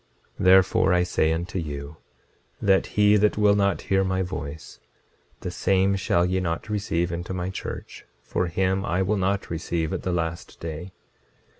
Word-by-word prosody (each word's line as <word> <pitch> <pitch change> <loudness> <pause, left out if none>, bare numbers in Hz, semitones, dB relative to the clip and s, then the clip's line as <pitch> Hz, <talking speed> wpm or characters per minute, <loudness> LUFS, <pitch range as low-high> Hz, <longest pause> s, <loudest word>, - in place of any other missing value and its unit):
26:28 - - -2
Therefore 95 0 +5
I 90 0 +3
say 85 -3 +1
unto 85 +3 -2
you, 75 -1 -6 0.6
that 95 -1 +3
he 105 0 +6
that 105 0 +2
will 105 -1 +5
not 100 -1 +1
hear 95 0 +1
my 95 0 0
voice, 80 -5 -7 0.6
the 90 - -4
same 95 +2 +2
shall 85 -2 +1
ye 90 +1 0
not 85 +2 -3
receive 95 -5 -1
into 85 +2 -4
my 90 +1 -3
church, - - -7 0.2
for 65 +8 -1
him 95 +2 0
I 95 -1 0
will 105 +3 +1
not 95 0 -1
receive 80 -1 -2
at - - -2
the 90 - -2
last 85 -1 -3
day. 80 +3 -6
90 Hz, 170 wpm, -25 LUFS, 85-95 Hz, 0.6 s, he